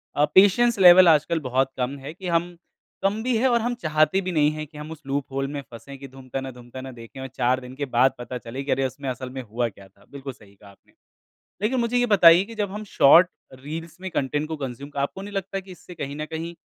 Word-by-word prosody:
अ, 145 Hz, -, +4 dB
patience 205 Hz, +3 st, +5 dB
level 180 Hz, 0 st, +9 dB
आजकल 160 Hz, +1 st, +3 dB
बहुत 130 Hz, -1 st, 0 dB
कम 130 Hz, +2 st, -2 dB
है 140 Hz, +3 st, -8 dB
कि 185 Hz, +2 st, -8 dB
हम 170 Hz, +1 st, 0 dB, 0.5 s
कम 205 Hz, +3 st, +1 dB
भी 250 Hz, -1 st, 0 dB
हैं 260 Hz, -, +2 dB
और 235 Hz, -2 st, +2 dB
हम 240 Hz, +1 st, -1 dB
चाहते 155 Hz, +4 st, +2 dB
भी 185 Hz, 0 st, -3 dB
नहीं 150 Hz, -2 st, +3 dB
है 155 Hz, 0 st, -5 dB
कि 150 Hz, +1 st, -15 dB
हम 150 Hz, +1 st, -8 dB
उस 160 Hz, -1 st, -9 dB
लूप 140 Hz, 0 st, -1 dB
होल 135 Hz, 0 st, -2 dB
में 145 Hz, 0 st, -5 dB
फँसें 130 Hz, +4 st, -10 dB
कि 140 Hz, -, -9 dB
धूमताना, 135 Hz, 0 st, -7 dB
धूमताना 125 Hz, +2 st, -10 dB
देखें 115 Hz, +1 st, -12 dB
और 135 Hz, -, -5 dB
4 125 Hz, +1 st, 0 dB
दिन 125 Hz, 0 st, -11 dB
के 145 Hz, +1 st, -3 dB
बाद 130 Hz, 0 st, +3 dB
पता 125 Hz, +1 st, -6 dB
चले 120 Hz, +3 st, -7 dB
कि 140 Hz, -, -3 dB
अरे, 135 Hz, -, +1 dB
उसमें 135 Hz, +1 st, -7 dB
असल 130 Hz, +1 st, -5 dB
में 130 Hz, +1 st, -6 dB
हुआ 120 Hz, +1 st, -2 dB
क्या 100 Hz, -2 st, -16 dB
था। 95 Hz, -, -26 dB
बिल्कुल 135 Hz, -1 st, -7 dB
सही 100 Hz, -3 st, -20 dB
कहा 100 Hz, +1 st, -17 dB
आपने। 100 Hz, -, -23 dB, 0.7 s
लेकिन 245 Hz, +4 st, +1 dB
मुझे 235 Hz, +1 st, 0 dB
ये 245 Hz, -, +2 dB
बताइए 180 Hz, -4 st, +7 dB
कि 230 Hz, +2 st, -11 dB
जब 205 Hz, -3 st, -2 dB
हम 210 Hz, +1 st, -6 dB
शॉर्ट 175 Hz, -1 st, +6 dB, 0.3 s
रील्स 160 Hz, +5 st, -7 dB
में 190 Hz, 0 st, -5 dB
कंटेंट 145 Hz, 0 st, -2 dB
को 160 Hz, -, -4 dB
कंज़्यूम 135 Hz, +1 st, -7 dB
आपको 140 Hz, +7 st, -2 dB
नहीं 205 Hz, +1 st, -8 dB
लगता 195 Hz, 0 st, -3 dB
कि 190 Hz, 0 st, -16 dB
इससे 180 Hz, 0 st, -13 dB
कहीं 145 Hz, -3 st, -6 dB
न 155 Hz, 0 st, -4 dB
कहीं 165 Hz, +2 st, -6 dB
145 Hz, 250 wpm, -24 LUFS, 130-180 Hz, 0.7 s, level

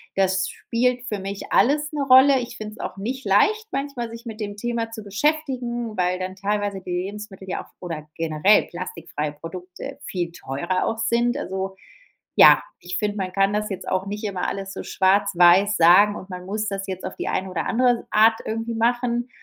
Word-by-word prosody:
das 190 Hz, 0 st, +2 dB
spielt 250 Hz, +1 st, -1 dB
für 210 Hz, -2 st, -3 dB
mich 195 Hz, +1 st, -6 dB
alles 295 Hz, +3 st, +3 dB
'ne 295 Hz, -2 st, -2 dB
Rolle. 265 Hz, +1 st, +7 dB
Ich 245 Hz, -1 st, -6 dB
finde 215 Hz, 0 st, -7 dB
es -, -, -16 dB
auch 190 Hz, -, -5 dB
nicht 255 Hz, +7 st, -4 dB
leicht, 425 Hz, -, +3 dB
manchmal 275 Hz, -4 st, -3 dB
sich 230 Hz, +1 st, -10 dB
mit 225 Hz, -2 st, -7 dB
dem 205 Hz, -1 st, -4 dB
Thema 230 Hz, 0 st, -2 dB
zu 225 Hz, -1 st, -7 dB
beschäftigen, 240 Hz, -1 st, -1 dB
weil 180 Hz, 0 st, +1 dB
dann 185 Hz, +1 st, -4 dB
teilweise 200 Hz, 0 st, -2 dB
die 180 Hz, -, -7 dB
Lebensmittel 190 Hz, +1 st, -5 dB
ja -, -, -3 dB
auch -, -, -23 dB
oder 160 Hz, -4 st, -6 dB
generell 165 Hz, +5 st, +3 dB
plastikfreie 165 Hz, -4 st, -5 dB
Produkte 180 Hz, +4 st, -8 dB
viel 175 Hz, -2 st, -3 dB
teurer 170 Hz, +4 st, -2 dB
auch 225 Hz, -, -2 dB
sind. 235 Hz, +2 st, +1 dB
Also, 190 Hz, -8 st, -4 dB, 0.6 s
ja, -, -, +8 dB, 0.2 s
ich 180 Hz, +1 st, -5 dB
finde, 210 Hz, -1 st, -1 dB
man 185 Hz, -1 st, -3 dB
kann 195 Hz, +1 st, +2 dB
das 210 Hz, 0 st, -1 dB
jetzt 195 Hz, -, -5 dB
auch 185 Hz, +1 st, -1 dB
nicht 210 Hz, +2 st, -5 dB
immer 190 Hz, -3 st, -2 dB
alles 195 Hz, 0 st, -4 dB
so -, -, -6 dB
schwarz-weiß 195 Hz, 0 st, +4 dB
sagen, 200 Hz, +5 st, +6 dB
und 190 Hz, -, -9 dB
man 180 Hz, -1 st, -7 dB
muss 215 Hz, +3 st, -3 dB
das 195 Hz, -1 st, -3 dB
jetzt 185 Hz, -1 st, -5 dB
auf -, -, -5 dB
die -, -, -3 dB
eine 190 Hz, 0 st, -1 dB
oder 170 Hz, -3 st, -3 dB
andere 245 Hz, 0 st, +2 dB
Art 225 Hz, +1 st, +4 dB
irgendwie 225 Hz, +1 st, -3 dB
machen. 240 Hz, +1 st, 0 dB
205 Hz, 195 wpm, -23 LUFS, 185-235 Hz, 0.6 s, ja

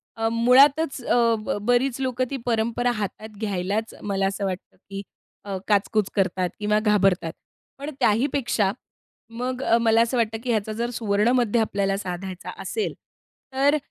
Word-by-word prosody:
अ, 225 Hz, 0 st, 0 dB
मुळातच 270 Hz, +5 st, +4 dB
अ, 230 Hz, -1 st, +3 dB
ब 215 Hz, -, -2 dB
बरीच 245 Hz, +2 st, +2 dB
लोकं 255 Hz, -1 st, 0 dB
ती 275 Hz, -, -2 dB
परंपरा 235 Hz, +1 st, +1 dB
हातात 215 Hz, +2 st, -5 dB
घ्यायलाच 205 Hz, +1 st, -2 dB
मला 195 Hz, -1 st, 0 dB
असं 195 Hz, +1 st, -2 dB
वाटतं 185 Hz, -1 st, -5 dB
की 195 Hz, 0 st, -5 dB, 0.4 s
अ, 195 Hz, -2 st, -3 dB
काच-कुच 210 Hz, 0 st, +2 dB
करतात 185 Hz, -2 st, +1 dB
किंवा 210 Hz, 0 st, +2 dB
घाबरतात. 195 Hz, -6 st, +2 dB, 0.5 s
पण 285 Hz, -, -5 dB
त्याहीपेक्षा 235 Hz, -3 st, +2 dB, 0.6 s
मग 250 Hz, +2 st, -4 dB, 0.2 s
मला 225 Hz, 0 st, +4 dB
असं 235 Hz, +2 st, +1 dB
वाटतं 225 Hz, -1 st, 0 dB
की 250 Hz, -, -4 dB
ह्याचा 215 Hz, -1 st, 0 dB
जर 235 Hz, +2 st, -2 dB
सुवर्णमध्य 225 Hz, +2 st, +2 dB
आपल्याला 200 Hz, -3 st, 0 dB
साधायचा 185 Hz, -1 st, -6 dB
असेल 435 Hz, -1 st, -2 dB, 0.6 s
तर 280 Hz, +3 st, +3 dB
220 Hz, 140 wpm, -24 LUFS, 200-245 Hz, 0.6 s, मुळातच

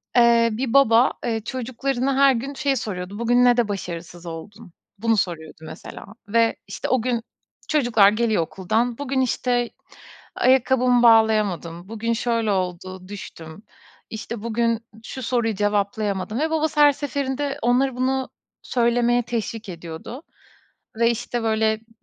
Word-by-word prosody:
eee, 235 Hz, -1 st, +5 dB
bir 235 Hz, +2 st, -3 dB
baba, 250 Hz, -2 st, +5 dB
eee, 225 Hz, -2 st, -1 dB
çocuklarına 260 Hz, +2 st, -2 dB
her 275 Hz, -1 st, +6 dB
gün 265 Hz, +4 st, -4 dB
şey 280 Hz, 0 st, 0 dB
soruyordu: 200 Hz, -4 st, -5 dB
"Bugün 245 Hz, +1 st, +3 dB
ne 245 Hz, 0 st, +5 dB
de 240 Hz, -3 st, +2 dB
başarısız 175 Hz, -3 st, -6 dB
oldun?" 175 Hz, +4 st, -9 dB, 0.2 s
bunu 225 Hz, +2 st, +1 dB
soruyordu 170 Hz, -5 st, -3 dB
mesela 160 Hz, +1 st, -10 dB, 0.2 s
ve, 230 Hz, +2 st, +2 dB
işte, -, -, -5 dB
o 255 Hz, -2 st, +2 dB
gün 240 Hz, -1 st, -1 dB, 0.5 s
çocuklar 240 Hz, -9 st, +4 dB
geliyor 215 Hz, -2 st, +1 dB
okuldan, 220 Hz, +8 st, -1 dB
bugün, 275 Hz, -2 st, -1 dB
işte, 245 Hz, -1 st, 0 dB, 0.7 s
ayakkabımı 255 Hz, -1 st, +3 dB
bağlayamadım, 210 Hz, -7 st, +3 dB
bugün, 225 Hz, +1 st, -2 dB
şöyle, 230 Hz, -2 st, 0 dB
oldu 185 Hz, 0 st, -3 dB
düştüm, 175 Hz, -3 st, -10 dB, 0.5 s
işte, 220 Hz, 0 st, -6 dB
bugün 230 Hz, 0 st, 0 dB, 0.2 s
şu 260 Hz, +2 st, -7 dB
soruyu 230 Hz, -2 st, 0 dB
cevaplayamadım 205 Hz, +1 st, -1 dB
ve 315 Hz, +2 st, 0 dB
babası 315 Hz, -1 st, 0 dB
her 290 Hz, 0 st, +8 dB
seferinde 280 Hz, 0 st, -3 dB
onları 250 Hz, +2 st, +2 dB
bunu 260 Hz, +1 st, -1 dB, 0.3 s
söylemeye 240 Hz, 0 st, +2 dB
teşvik 225 Hz, -2 st, -4 dB
ediyordu 170 Hz, -, -8 dB, 0.8 s
ve, 230 Hz, 0 st, +4 dB
işte, 240 Hz, 0 st, -3 dB
böyle, 220 Hz, 0 st, +2 dB
ımm, 220 Hz, +1 st, -11 dB
230 Hz, 135 wpm, -23 LUFS, 205-250 Hz, 0.8 s, her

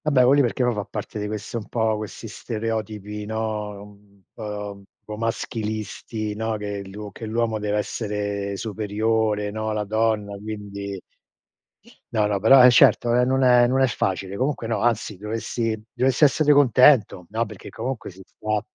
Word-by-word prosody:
Vabbè, 135 Hz, -5 st, +4 dB
que 130 Hz, -, +6 dB
lì 145 Hz, -, +5 dB
perché 125 Hz, 0 st, 0 dB
poi 125 Hz, 0 st, +2 dB
fa 105 Hz, -2 st, -3 dB
parte 105 Hz, 0 st, -6 dB
di 105 Hz, -, -3 dB
questo 105 Hz, +2 st, -5 dB
un 105 Hz, -, -10 dB
po' 110 Hz, -2 st, 0 dB
questi 110 Hz, +2 st, -7 dB
stereotipi, 105 Hz, -2 st, -4 dB
no, 105 Hz, -2 st, -3 dB
un 100 Hz, -1 st, -18 dB
po' 105 Hz, -2 st, -5 dB
un -, -, -17 dB, 0.2 s
po' 105 Hz, -, -6 dB
maschilisti, 110 Hz, -1 st, -3 dB
no, 110 Hz, +1 st, -2 dB
che 100 Hz, -1 st, -5 dB
l'uo 105 Hz, +1 st, -8 dB
che 110 Hz, -, -8 dB
l'uomo 110 Hz, 0 st, 0 dB
deve 105 Hz, 0 st, -1 dB
essere 100 Hz, -2 st, -3 dB
superiore, 110 Hz, 0 st, -1 dB
no, 110 Hz, +1 st, -3 dB
la 105 Hz, 0 st, -1 dB
donna, 110 Hz, -1 st, 0 dB
quindi 100 Hz, -2 st, -6 dB, 1.1 s
No, 110 Hz, -2 st, +2 dB
no, 100 Hz, -2 st, -1 dB
però, 130 Hz, +5 st, +8 dB
eh -, -, +9 dB
certo 120 Hz, 0 st, +5 dB
non 120 Hz, -, +4 dB
è -, -, +4 dB
non 130 Hz, +1 st, +2 dB
è 125 Hz, -1 st, +6 dB
non 130 Hz, +2 st, +1 dB
è 130 Hz, -, +5 dB
facile. 95 Hz, -3 st, -2 dB
Comunque 130 Hz, 0 st, -1 dB
no, 110 Hz, -2 st, -1 dB
anzi 115 Hz, -2 st, 0 dB
dovessi 110 Hz, +1 st, -3 dB
dovessi 130 Hz, +4 st, +3 dB
essere 150 Hz, +1 st, +3 dB
contento. 130 Hz, -8 st, +5 dB
No, 115 Hz, +2 st, -1 dB
perché 105 Hz, -3 st, -10 dB
comunque 130 Hz, -2 st, -5 dB
si 95 Hz, +1 st, -15 dB
sta 110 Hz, -1 st, -3 dB
110 Hz, 175 wpm, -23 LUFS, 105-115 Hz, 1.1 s, eh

